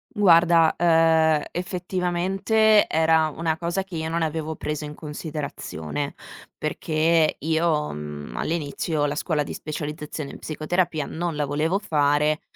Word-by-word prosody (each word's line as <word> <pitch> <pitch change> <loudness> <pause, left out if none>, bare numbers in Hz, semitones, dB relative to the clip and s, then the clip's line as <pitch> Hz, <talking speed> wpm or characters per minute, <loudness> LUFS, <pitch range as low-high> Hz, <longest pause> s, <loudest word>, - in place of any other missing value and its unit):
Guarda, 170 -4 +5
ehm, 160 -2 +4
effettivamente 185 +4 +1
era 160 0 +3
una 160 +1 -2
cosa 175 +3 -2
che 190 -3 -10
io 160 0 -3
non 170 +1 -1
avevo 160 0 -2
preso 150 0 -4
in 150 - -7
considerazione, 145 - -5 0.4
perché 155 +1 +1
io, 160 -1 +1
mhmm, 75 -4 -7
all'inizio 155 -1 -1
la 145 - -2
scuola 155 -2 0
di 145 - -4
specializzazione 150 -1 -5
in - - -9
psicoterapia 160 0 -1
non 170 0 -3
la 150 0 0
volevo 155 +7 0
fare 150 -4 +1
160 Hz, 130 wpm, -24 LUFS, 150-170 Hz, 0.4 s, Guarda